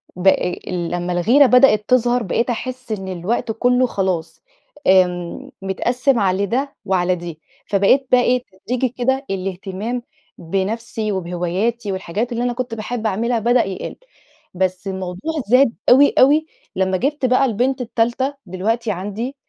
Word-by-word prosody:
ب 180 +2 -2
آآ 180 -2 +3
لمّا 175 0 -2
الغيرة 235 +12 +5
بدأت 250 -5 +5
تظهر، 245 -1 +3
بقيت 230 +5 -1
أحس 255 0 -5
إن 190 -3 -4
الوقت 190 +6 -2
كلّه 250 +3 +2
خلاص، 185 -6 -3 0.4
آمم، 180 +6 +2
متقسم 240 +7 0
على 195 0 +1
ده 265 +7 -2
وعلى 185 -2 +1
دي، 170 -2 -8 0.3
فبقيت 205 +7 +3
بقى 250 - +6
إيه 250 0 +1 0.2
تدريجي 250 +1 0
كده 265 +3 -1
الاهتمام 195 +5 -4 0.3
بنفسي، 210 +5 -3
وبهواياتي 190 +5 -2
والحاجات 190 +5 -3
اللي 235 0 -2
أنا 245 0 0
كنت 245 -1 -4
باحب 225 +1 -3
أعملها 230 +4 0
بدأ 240 +2 +3
يقل. 190 -1 -6 0.6
بس 185 +1 -2
الموضوع 190 - -4
زاد 250 +1 +4 0.2
أوي، 280 +3 +6
أوي 295 +4 +5 0.3
لمّا 190 0 +1
جِبت 280 +5 -1
بقى 255 +2 +3
البنت 255 +3 0
التالتة 240 +4 -1
دلوقتي 215 +5 -1
عندي 205 +8 -4
220 Hz, 140 wpm, -20 LUFS, 190-250 Hz, 0.6 s, بقى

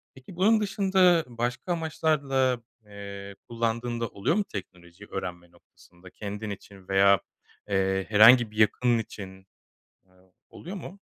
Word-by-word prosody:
Peki, 130 +7 -13
bunun 215 +5 +4
dışında 190 -4 +3
başka 120 +7 -3
amaçlarla, 140 -6 0 0.3
eee, 100 -1 -9
kullandığın 115 +1 -2
da 115 - 0
oluyor 100 - -1
mu 210 - +1
teknolojiyi 90 0 -10
öğrenme 90 -2 -6
noktasında? 90 +1 -19
Kendin 105 +1 -6
için 100 -1 -10
veya, 100 0 +5 0.5
eee, 95 -1 0
herhangi 115 +2 +7
bir 110 - -14
yakının 120 +2 +3
için, 95 -3 -9 0.6
eee, 95 - -32 0.4
oluyor 185 +4 -9
mu? 195 +2 -10
110 Hz, 130 wpm, -27 LUFS, 95-135 Hz, 0.6 s, herhangi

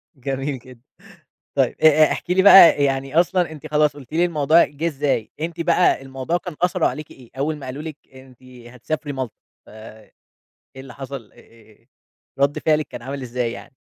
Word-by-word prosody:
جميل 135 +1 -4
جدًا. 125 -1 -16 0.7
طيب 135 -3 +1
أ - - +7 0.2
أ - - -1
احكي 180 - -3
لي 190 - +3
بقى 185 -7 +8
يعني 135 +3 +1
أصلًا 180 -1 0
أنتِ 155 0 -10
خلاص 150 0 +2
قلتِ 140 0 -14
لي 170 +2 +2
الموضوع 160 -1 +3
جه 150 +3 -5
إزاي، 140 -7 -1
أنتِ 170 +1 -5
بقى 170 -4 +2
الموضوع 135 +5 -3
كان 175 -4 -9
أثره 180 -1 +1
عليكِ 155 -1 -4
إيه 125 -3 -16
أول 155 +2 -1
ما 140 - -10
قالوا 135 +4 -6
لِك 155 -2 -7 0.2
أنتِ 130 -1 -17
هتسافري 125 +4 -7
مالطا؟ 130 -4 -5 0.3
ف - - -20
إيه 110 0 -14 0.6
اللي 130 -1 -11
حصل؟ 135 -4 -8
آآ، 110 -2 -22 0.5
رَد 140 +1 +1
فعلِك 155 -1 +1
كان 120 - -9
عامل 135 +1 -6
إزاي 120 -1 -3
يعني؟ 135 +2 -12
140 Hz, 180 wpm, -21 LUFS, 130-155 Hz, 0.7 s, بقى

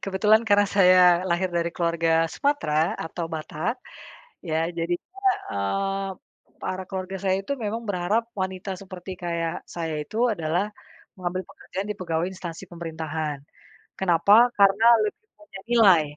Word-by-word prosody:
Kebetulan 210 +3 +3
karena 205 0 +5
saya 185 -2 +7 0.3
lahir 175 +1 0
dari 170 0 0
keluarga 165 -1 +2
Sumatera 165 - +1
atau 165 +1 -4
Batak, 160 +7 -3 0.7
ya, 155 - -1 0.2
jadinya, 175 - -4 0.3
mmm, 195 - -1 0.5
para 185 0 -3
keluarga 190 0 -4
saya 190 -1 +2
itu 245 - -2
memang 220 +2 -3
berharap 200 +4 0 0.2
wanita 190 +1 -4
seperti 185 -1 -9
kayak 170 -1 -1 0.2
saya 165 -2 -3
itu 215 - -8 0.2
adalah, 170 0 0 0.5
mengambil 185 0 -3
pekerjaan 195 +2 -6
di 210 - -3
pegawai 170 -3 -2
instansi 180 -3 -7
pemerintahan. 160 -3 -4 0.6
Kenapa? 200 +7 +5
Karena 200 +2 +5 0.2
lebih 215 - -4 0.2
banyak 205 -11 -12
nilai. 200 -9 +6
185 Hz, 130 wpm, -25 LUFS, 165-200 Hz, 0.7 s, saya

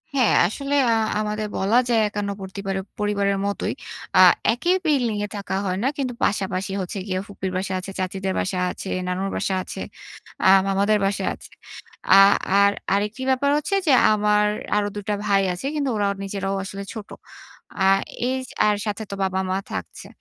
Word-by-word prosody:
হ্যাঁ, 250 -5 +3
আসলে 275 +8 -4 0.2
আ - - +4 0.3
আমাদের 215 0 -2
বলা 205 +5 +2
যায় 230 -2 +3
একান্নবর্তী 200 -2 -5
বারে 195 0 -1 0.2
পরিবারের 200 -1 +1
মতোই 200 0 -2 0.4
আ - - +7 0.3
একই 345 +9 +1
বিল্ডিং 255 -8 +1
এ - - -6
থাকা 195 -1 -4
হয় 185 0 -1
না। - - +2
কিন্তু 260 -3 -2
পাশাপাশি 190 -1 -1
হচ্ছে 185 +2 -5
গিয়ে 185 -1 -1
ফুপির 190 -2 -5
বাসা 190 0 -3
আছে, 185 +1 -7
চাচীদের 190 +1 -2
বাসা 185 -1 -1
আছে, 195 - -7 0.2
নানুর 185 +2 -2
বাসা 190 - -1
আছে, - - -7 0.6
আ - - +6 0.2
মামাদের 200 +2 +2
বাসায় 195 0 -1
আছে। - - -13 0.6
আ - - +9 0.4
আর 200 0 +5 0.2
আরেকটি 210 +5 -1
ব্যাপার 265 +2 +2
হচ্ছে 300 +7 -1
যে - - +5 0.2
আমার 210 0 +3 0.3
আরো 205 0 +1
২ 205 - -5
টা 205 - +1
ভাই 200 -1 +3
আছে। 180 +9 -7
কিন্তু 280 -3 0
ওরাও 200 -1 +1
নিজেরাও 195 0 -3
আসলে 195 +1 -6
ছোট। 215 -3 -8 0.7
আ 190 - +3 0.4
এইজ 260 0 -2 0.2
আর 210 - +3
সাথে 210 +1 -3
তো - - -3
বাবা-মা 190 0 -1
থাকছে। - - -6
200 Hz, 170 wpm, -23 LUFS, 195-215 Hz, 0.7 s, আ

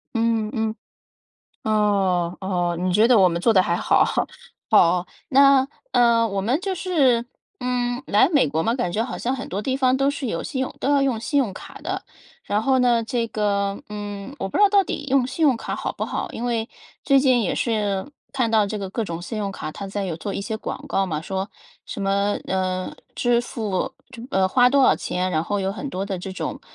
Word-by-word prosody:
嗯， 225 -1 +1
嗯。 220 -2 -1 0.9
哦， 195 -5 +1
哦， 175 -3 -1
你 185 0 0
觉 215 +5 +4
得 245 -3 +6
我 185 -2 +6
们 170 0 -2
做 230 - +4
的 190 - +5
还 170 - 0
好 - - +3
吼。 - - 0 0.5
好， 180 -4 +5 0.2
那， 275 -1 +6 0.3
呃， 235 -1 +4
我 195 -1 -2
们 245 - 0
就 385 0 -2
是， 275 -11 +2 0.3
嗯， 245 -2 -1
来 205 - +4
美 290 - +3
国 160 +3 -1
嘛， 230 - +1
感 210 -9 -1
觉 220 +5 0
好 - - -5
像 250 +2 -1
很 265 - -6
多 195 +3 -3
地 260 +4 -1
方 260 -1 +3
都 275 +1 +2
是 285 -1 -4
有 165 -6 -2
信 260 - -3
用 260 - -2
都 275 - -1
要 280 -1 +4
用 260 -5 +1
信 285 +5 0
用 230 -8 +1
卡 - - -11
的， - - -4 0.4
然 210 +1 0
后 265 +2 +3
呢， 240 -2 +3
这 230 +1 -1
个， 200 -2 -1
嗯， 205 +2 -6
我 - - -3
不 - - -4
知 - - +4
道 410 - +7
到 400 0 +4
底 295 - -5
用 265 -2 +3
信 265 +5 -4
用 270 -5 +4
卡 - - -4
好 - - -3
不 - - -4
好， - - -4
因 235 - -5
为 230 -2 -1 0.4
最 275 -1 +5
近 260 -3 +3
也 195 - 0
是 210 -2 -1 0.2
看 255 -4 +1
到 220 -2 +4
这 210 +1 -4
个 195 -2 -4
各 225 +3 -2
种 170 -3 -5
信 220 - -5
用 200 -1 -2
卡 155 - -6
它 200 - -7
在 200 0 -3
有 170 -4 -3
做 200 +3 -5
一 - - -3
些 220 +2 -3
广 265 +5 -6
告 195 - +1
嘛， 155 -4 -2
说 190 +4 -3 0.4
什 - - -7
么， 200 +1 +1
呃， 185 -1 -1 0.2
支 240 -1 +2
付 220 -1 -3 0.2
就 240 -3 -10
啊， 190 0 +4
花 245 +5 +5
多 275 +1 +3
少 - - +5
钱， 180 +1 -2
然 155 -1 +1
后 205 +4 -2
有 195 0 -1
很 250 +7 -5
多 190 -3 -3
的 195 -2 -3
这 190 +2 -6
种， - - -4
220 Hz, 245 characters per minute, -23 LUFS, 195-255 Hz, 0.9 s, 道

